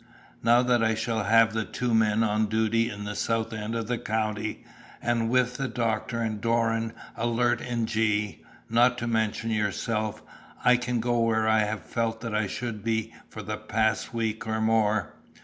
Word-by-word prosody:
"Now 120 +2 +5
that 120 -2 +2
I 110 0 +2
shall 110 -1 -1
have 115 +1 +5
the 110 -1 0
two 120 +2 -2
men 110 0 +3
on 110 0 +1
duty 110 +2 +1
in 105 0 -6
the 105 0 -4
south 115 +1 -1
end 110 +1 -4
of 115 -1 -2
the 120 -1 -1
county, 110 0 -2 0.3
and 115 -1 0
with 125 0 +2
the 135 - -1
doctor 115 0 -1
and 110 -2 -3
Doran 115 0 +1 0.2
alert 120 +1 +1
in 120 -2 -1
G, 105 -2 0 0.2
not 120 +2 +4
to 120 - -3
mention 115 0 0
yourself, 110 0 -1 0.4
I 125 - +7
can 120 -1 -1
go 120 0 +1
where 110 -1 +2
I 110 0 +4
have 105 -4 -4
felt 115 -1 -2
that 115 -2 -4
I 105 -1 +1
should 110 0 -5
be 110 0 -1 0.2
for - - -8
the - - -4
past 110 0 0
week 110 -2 -2
or 110 0 -1
more. 110 -2 +1
115 Hz, 185 wpm, -27 LUFS, 110-115 Hz, 0.4 s, I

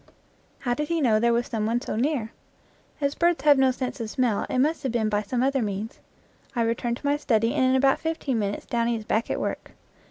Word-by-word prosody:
How 245 -2 0
did 300 +4 -2
he 335 +1 0
know 230 -7 +3
there 235 +1 +3
was 235 +1 +1
some 215 -2 -2
one 235 +2 +1
so - - -5
near? 240 -2 -1 0.7
As 280 -1 0
birds 345 +1 +1
have 290 -2 +6
no 265 -1 +5
sense 255 0 -3
of 225 -2 -4
smell 235 -3 0
it - - -1
must 300 +6 +2
have 265 - -2
been 225 -2 0
by 205 0 +1
some 240 +4 -1
other 270 0 +1
means. 210 +1 -4 0.6
I 235 - +2
return 235 +1 -1
to 270 - -12
my 285 +1 +2
study 230 -5 +1
and - - +1
in 260 0 +3
about 270 +1 +3
fifteen 315 -7 -2
minutes 205 -1 -3
Downy 235 0 0
is 220 -1 -6
back 220 +2 0
at - - -1
work. - - -4
240 Hz, 235 wpm, -25 LUFS, 225-275 Hz, 0.7 s, have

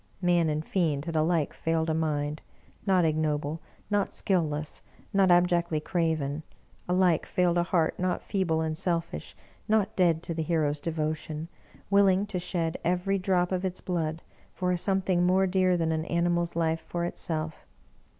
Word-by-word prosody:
Man 175 -3 +3
and 155 +1 -2
fiend 155 -6 0
had 165 -1 -4
alike 160 -1 +1
failed 165 0 -1
a 160 - +1
mind, 150 -1 -1 0.5
not 185 -3 +4
ignoble, 155 0 0 0.3
not 205 -1 +1
skill 185 -3 +1
less, 150 -1 -4 0.3
not 195 -1 +4
abjectly 175 -2 +3
craven; 155 -3 -1 0.5
alike 180 -3 +3
failed 175 -1 +2
a - - +4
heart 170 -2 0
not 185 0 -1
feeble 180 -6 0
and 160 -1 -1
selfish, 170 0 -2 0.3
not 215 -2 +2
dead 170 -3 +2
to 170 - -3
the 160 - -2
hero's 150 -2 0
de 165 - -2
votion, 155 0 -3 0.4
willing 200 -1 +4
to 200 -3 -3
shed 170 -2 -2
every 180 +3 +1
drop 180 -1 +1
of 185 0 -1
its 185 -1 -3
blood 165 -3 -2 0.3
for 180 -1 -1
a - - +2
some 195 +1 +2
thing 180 -2 +1
more 185 +2 +4
dear 185 -1 +2
than 165 -1 0
an 160 0 -1
animal's 170 0 0
life 165 -1 0
for 170 +1 -3
itself! 160 -2 -4
170 Hz, 170 wpm, -28 LUFS, 160-180 Hz, 0.5 s, not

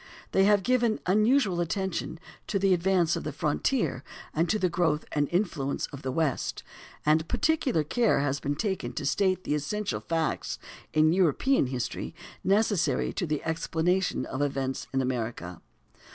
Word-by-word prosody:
They 195 - +4
have 205 -1 +4
given 240 -2 +2
unusual 210 0 +3
attention 175 -1 -2 0.3
to 205 - 0
"the 195 -1 +3
advance 175 -1 +2
of - - -4
the 155 - -3
frontier" 150 - 0 0.3
and 165 +3 +1
to 215 - +2
"the 185 - +2
growth 170 -3 0
and 145 -1 0
influence 170 -7 -1
of 140 - -7
the 130 - -3
West"; 150 -2 -1 0.4
and 155 +2 +3
"particular 285 - +1
care 230 - +2
has 140 -1 0
been 145 +1 -2
taken 175 - -2
to - - -4
state 185 +4 +1
the - - -1
essential 200 +8 -2
facts 165 -1 -2 0.3
in 155 +1 +4
European 185 - +3
history 125 +4 -4 0.3
necessary 195 - +2
to 180 - -2
the 150 -2 -2
explanation 165 -1 0
of 130 - -4
events 135 -2 -2
in 135 0 +1
America." 115 -8 -3
165 Hz, 155 wpm, -28 LUFS, 145-195 Hz, 0.4 s, They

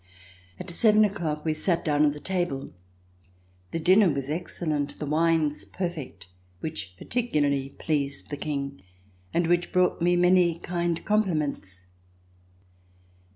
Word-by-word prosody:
At - - -6
seven 215 +4 +5
o'clock 165 -7 -3
we 155 - +2
sat 165 +2 0
down 150 -1 +3
at 145 - +1
the 150 - -9
table. 175 -7 -2 1.0
The 165 - -3
dinner 185 +4 +5
was 140 0 -3
excellent, 155 -3 -2
the 150 - -4
wines 155 0 +1
perfect, 160 - -5 0.3
which 100 -12 -5
particularly 145 - 0
pleased 140 -3 -2
the 145 - -3
King, 140 -2 -4 0.5
and 170 - +1
which 175 +1 +1
brought 180 -1 +2
me 175 +1 +3
many 175 -1 +4
kind 170 -1 -2
compliments. 150 - -1
160 Hz, 125 wpm, -26 LUFS, 145-175 Hz, 1.0 s, seven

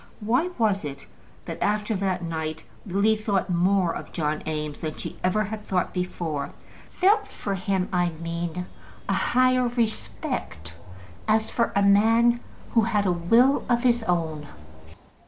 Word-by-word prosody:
Why 245 +11 +1
was 210 -5 +2
it, 140 -2 -7 0.4
that - - -6
after 210 +1 +1
that 185 -2 -1
night 160 -1 -4 0.2
Lily 200 +4 +3
thought 205 -3 -1
more 180 0 +2
of - - -7
John 155 -2 -1
Eames 150 -1 -3
than 155 -1 -4 0.3
ever 185 +4 +2
she 205 - -5
had 220 -1 -4
thought 185 -2 -1
before; 165 -6 -3 0.4
felt 415 +3 +3
for 200 - -4
him, 190 0 -1
I 175 -1 +2
mean, 170 +1 -4 0.4
a - - +1
higher 255 0 +3
respect, 220 - -3 0.5
as 220 0 +2
for 235 - +1
a 200 - +3
man 225 +4 +5 0.3
who 230 - +4
had 215 -2 +1
a 185 - +3
will 230 +11 +4
of 240 0 +2
his 240 -1 +3
own? 160 -5 -1
195 Hz, 150 wpm, -25 LUFS, 170-225 Hz, 0.5 s, man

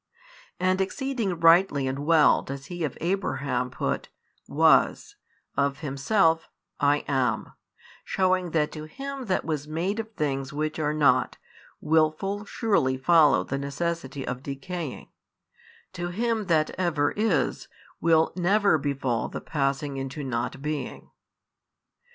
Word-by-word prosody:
And 185 +1 +2
exceeding 220 -4 -2
rightly 165 -4 +5
and 130 +1 -2
well 155 +1 +4
does 135 0 -7
He 175 +1 -5
of 150 - -3
Abraham 140 -8 -1
put, 65 - -3 0.4
Was, - - +3 0.4
of 140 +1 0
Himself, 160 +4 +1 0.3
I 145 +1 +2
am, 125 -5 0 0.5
shewing 185 -1 +1
that 155 -2 0
to 155 -1 -7
him 275 - -6
that 185 - 0
was 150 -2 -3
made 175 +7 -2
of 220 0 -5
things 135 -5 -2
which 155 +2 -3
are 150 -1 +1
not, 130 -4 +3 0.4
will 155 0 +3
full 195 +6 -5
surely 165 - +1
follow 155 +2 +5
the 135 - -3
necessity 140 -1 -3
of 125 0 -4
decaying, 145 +2 -6 0.8
to 175 0 -4
Him 220 +3 -1
That 155 -3 +2
ever 155 -5 +1
is 205 - 0 0.3
will 160 -1 +3
never 190 -1 +3
befall 135 -5 -1
the - - -5
passing 140 -1 -2
into 135 +2 -5
not 125 +1 -3
being. 150 -3 -5
155 Hz, 130 wpm, -26 LUFS, 140-180 Hz, 0.8 s, rightly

